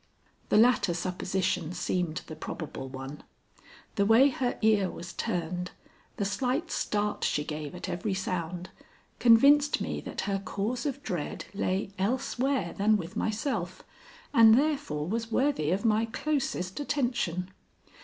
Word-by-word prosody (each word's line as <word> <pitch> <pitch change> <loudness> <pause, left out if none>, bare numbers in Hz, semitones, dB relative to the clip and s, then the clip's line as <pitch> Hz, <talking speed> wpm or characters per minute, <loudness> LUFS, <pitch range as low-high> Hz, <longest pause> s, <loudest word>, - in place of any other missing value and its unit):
The - - +4
latter 225 -6 +4
supposition 180 -1 -1
seemed 175 -3 -2
the 155 - -8
probable 155 -3 -6
one. 135 +2 -7 0.8
The 200 - +3
way 240 +6 +7
her 255 -2 -2
ear 210 -4 +4
was 175 +2 -8
turned, 180 -3 -2 0.5
the 200 - 0
slight 260 - -1
start 210 0 -1
she 150 - +1
gave 150 +1 -5
at 180 - -6
every 190 +3 -2
sound, 180 -1 -3 0.5
convinced 280 +5 +6
me - - -3
that - - -5
her 195 -1 -1
cause 210 +9 -2
of 280 0 -4
dread 170 -5 -4
lay 195 -1 -1
elsewhere 250 -1 0
than 215 +2 +3
with 175 -2 -7
myself, 210 -5 -2 0.5
and 225 0 +8
therefore 280 - 0
was 225 +3 -2
worthy 260 - +1
of 190 +6 0
my 220 0 +3
closest 230 -7 -2
attention. 240 - -1
200 Hz, 135 wpm, -29 LUFS, 175-245 Hz, 0.8 s, and